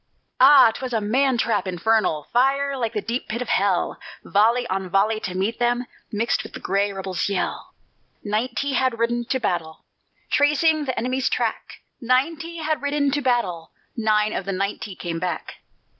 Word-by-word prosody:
_ - - -50 0.4
Ah! 265 -3 +8
'twas 255 +1 -5
a 225 - +2
man 250 +5 +1
trap 230 -4 0
infernal 185 -4 +1
Fire 275 +3 +2
like 230 -4 -2
the 210 - -2
deep 235 +4 -3
pit 225 +2 -3
of 250 - -4
hell! 195 -3 +1 0.2
Volley 230 +5 +2
on 190 0 -3
volley 210 +4 +2
to 185 -3 -5
meet 205 +5 -1
them, 240 +1 +1 0.3
Mixed 225 +2 0
with - - -11
the - - -7
gray 200 +1 0
rebel's 190 -1 -3
yell. 200 - -3 0.5
Ninety 245 +6 -1
had 255 -2 +1
ridden 235 +1 0
to 260 +2 -1
battle, 170 -8 -3 0.5
Tracing 300 +1 +3
the 260 -2 -3
enemy's 255 +2 0
track, - - -3 0.2
Ninety 290 +7 0
had 310 0 -1
ridden 285 -1 0
to 290 +1 0
battle, 215 -11 -1 0.2
Nine 215 -1 +1
of 195 - -3
the 195 - -2
ninety 200 +1 -3
came 170 -2 -4
back. 175 -2 -4
230 Hz, 175 wpm, -23 LUFS, 200-260 Hz, 0.5 s, Ah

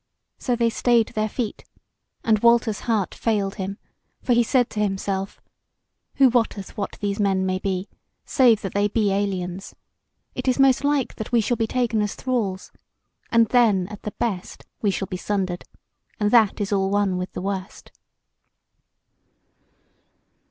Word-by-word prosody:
So 245 - 0
they 230 -1 +1
stayed 235 -1 +2
their 215 0 -1
feet, 225 -1 -4 0.6
and 220 -2 +3
Walter's 235 -1 +3
heart 220 -5 -1
failed 205 -4 -1
him, 195 +1 -4 0.5
for 250 - +2
he 240 - +5
said 245 +1 +2
to 215 - -4
himself: 195 -1 -2 0.8
Who 270 -2 +6
wotteth 225 -5 -1
what 200 - -4
these 205 0 -2
men 195 -2 +1
may 185 0 -1
be, 190 0 -2 0.4
save 240 -6 +4
that 195 - -4
they 205 +1 +2
be 210 -1 +1
aliens? 195 -2 -3 0.6
It - - -5
is 255 - +3
most 270 0 +4
like 285 -3 0
that 220 - -6
we 240 - +4
shall 230 +3 +1
be 225 0 0
taken 235 -3 0
as 210 -1 -2
thralls; 215 -7 -2 0.6
and 230 -1 +5
then, 215 -7 +3
at 210 -1 -9
the 210 - -6
best, 200 -7 -4 0.2
we 210 - +2
shall 195 0 -1
be 185 - -4
sundered; 185 -2 -2 0.5
and 210 -1 +1
that 225 -4 +4
is 205 0 -1
all 195 -1 +1
one 200 -2 +1
with 180 - -5
the - - -5
worst. 195 -1 -5
210 Hz, 160 wpm, -23 LUFS, 195-235 Hz, 0.8 s, Who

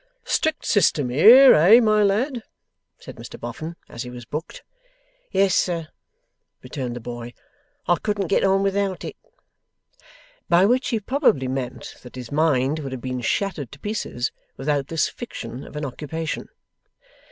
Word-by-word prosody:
'Strict 315 -8 -1
system 145 - +2
here; 240 - +8
eh, 190 +10 +7
my 215 -3 +3
lad?' 230 +6 +1 0.6
said - - -12
Mr - - -10
Boffin, 165 +1 -6
as 120 - -8
he 125 - -6
was 125 -1 -9
booked. 155 +6 -7 0.7
'Yes, 195 -1 +2
sir,' 170 -3 0 0.7
returned 125 -2 -5
the - - -5
boy. 120 0 -8 0.5
'I 175 - +3
couldn't 205 -2 -2
get 180 - +1
on 195 0 +3
without 195 -1 -1
it.' - - -6 1.3
By 175 +2 +5
which 245 +4 +2
he 230 - 0
probably 215 - +1
meant 130 -1 -5
that 125 - -13
his 125 -2 -8
mind 145 -1 +1
would 135 -3 -6
have 130 - -5
been 130 0 -4
shattered 170 - -2
to 140 - -12
pieces 205 - -3 0.3
without 140 0 -1
this 165 -1 0
fiction 125 - -8
of - - -13
an 150 0 -3
occupation. 150 +4 -5
160 Hz, 150 wpm, -23 LUFS, 130-200 Hz, 1.3 s, here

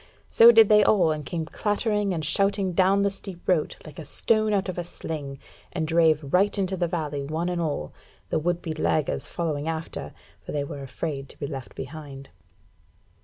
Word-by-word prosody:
So 230 +1 +8
did 225 -2 +7
they 210 0 +6
all, 180 -6 +4
and 155 -1 -3
came 165 +1 -3
clattering 210 +2 0
and 160 -4 -2
shouting 195 +2 +1
down 195 +2 +3
the 200 - +2
steep 195 -2 -10
road 175 -5 +1
like 155 +1 -10
a - - -6
stone 215 +9 +1
out 200 -2 +1
of 185 -1 -4
a - - -2
sling, 150 -5 -6 0.3
and 160 -3 -2
drave 160 -3 +2
right 200 +3 +4
into 190 -1 0
the 175 -1 0
valley 150 -5 -3
one 160 +5 -2
and 175 -1 -1
all, 145 - -3 0.4
the 160 - +1
would 175 +2 -1
be 160 - -3
laggards 155 -1 -1
following 155 -3 -2
after; 160 0 -5 0.3
for - - -7
they 145 -1 0
were 140 0 -7
afraid 135 +1 -5
to - - -16
be 145 - -4
left 135 -3 -7
behind. 140 -1 -8
165 Hz, 195 wpm, -25 LUFS, 150-195 Hz, 0.4 s, So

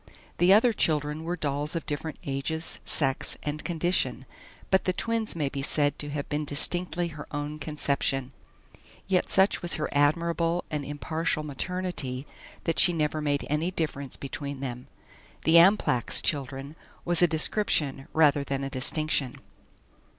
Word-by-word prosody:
The 175 +2 +5
other 225 +4 +6
children 150 -3 +1
were 170 +2 -2
dolls 145 -1 -2
of 165 - -3
different 150 +1 -4
ages, 145 +4 -3
sex, 135 -3 +1
and 150 +1 -3
condition, 175 +1 -1 0.5
but 190 - +3
the 185 - +1
twins 225 +1 -2
may 150 -4 -1
be 135 0 -4
said 145 0 +1
to 145 - -5
have 145 -1 -4
been 150 +1 -2
distinctly 175 +4 0
her 155 -2 -9
own 150 +1 -4
conception. 140 -3 -1 0.7
Yet 185 -2 +1
such 190 +1 +4
was 175 - +3
her 155 - -2
admirable 165 +4 +1
and 150 -2 -2
impartial 155 +2 -2
maternity 150 -3 -3 0.4
that 165 - 0
she 175 - +7
never 155 -1 -1
made 145 -1 0
any 155 +4 0
difference 150 -6 -4
between 140 0 -6
them. 125 -2 -6 0.6
"The 165 +1 +7
Amplach's 170 - +3
children" 140 +1 -2 0.3
was 175 -1 +2
a 175 - +6
description 155 -4 +1
rather 150 -3 +4
than 135 -1 -3
a 135 - -4
distinction. 140 0 +1
150 Hz, 150 wpm, -27 LUFS, 140-170 Hz, 0.7 s, she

